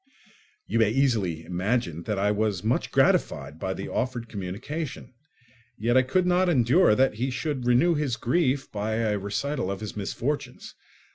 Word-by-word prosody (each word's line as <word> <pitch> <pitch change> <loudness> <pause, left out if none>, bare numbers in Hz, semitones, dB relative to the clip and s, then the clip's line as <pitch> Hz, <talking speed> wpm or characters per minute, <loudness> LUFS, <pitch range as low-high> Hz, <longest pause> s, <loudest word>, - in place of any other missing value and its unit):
You - - 0
may 110 -2 +4
easily 110 - +1
imagine 90 -1 -1
that 105 -2 -2
I 100 +1 +2
was 105 -3 -1
much 115 +3 0
gratified 70 +3 +1
by 95 +1 -2
the 95 - -5
offered 120 -1 -2
communication, 115 - -5 0.6
yet 120 +3 +1
I 130 - +7
could 175 +8 +1
not 180 0 +3
endure 130 - +4
that 130 +2 +3
he 130 - +1
should 130 -1 -3
renew 125 +8 +4
his 145 -6 -1
grief 135 +2 0
by 105 +1 -2
a 110 -2 0
recital 105 +4 -2
of 100 -1 -3
his 105 -1 -6
misfortunes. 120 +8 -4
115 Hz, 160 wpm, -26 LUFS, 100-135 Hz, 0.6 s, I